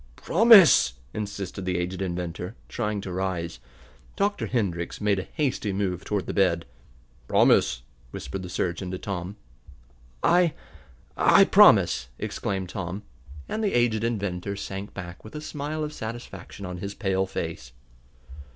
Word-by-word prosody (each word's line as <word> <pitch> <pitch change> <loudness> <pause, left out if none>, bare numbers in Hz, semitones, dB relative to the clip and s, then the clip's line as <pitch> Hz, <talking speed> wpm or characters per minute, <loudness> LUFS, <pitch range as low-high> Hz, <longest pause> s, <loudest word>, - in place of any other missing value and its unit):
"Promise!" 195 - +6 0.2
insisted 100 -3 -5
the 90 -1 -1
aged 90 +2 -3
inventor, 90 +2 -4
trying 105 -3 -2
to 95 - -6
rise. 90 -3 -3 0.6
Dr. 205 +1 0
Hendrix 90 -8 -2
made 105 -2 +1
a 95 - -6
hasty 135 -8 -1
move 95 -2 -2
toward 105 -3 -2
the - - -4
bed. 90 -4 +2 0.6
"Promise!" - - +3 0.3
whispered 70 +10 -6
the 90 - -7
surgeon 90 +1 -2
to 95 - -4
Tom. 95 0 -5 0.9
"I 175 -2 +4 0.6
I - - +6
promise!" 65 - +6
exclaimed 95 -2 -3
Tom, 95 +2 -5 0.4
and 220 - -3
the 205 - +1
aged 115 -2 +2
inventor 100 -4 -2
sank 100 0 -6
back 85 -3 -8
with 110 - -12
a - - -3
smile 155 0 -4
of 150 0 -4
satisfaction 110 -3 -7
on 90 -1 -6
his 100 +2 -5
pale 95 -2 0
face. 80 -9 -5
95 Hz, 140 wpm, -26 LUFS, 90-110 Hz, 0.9 s, Promise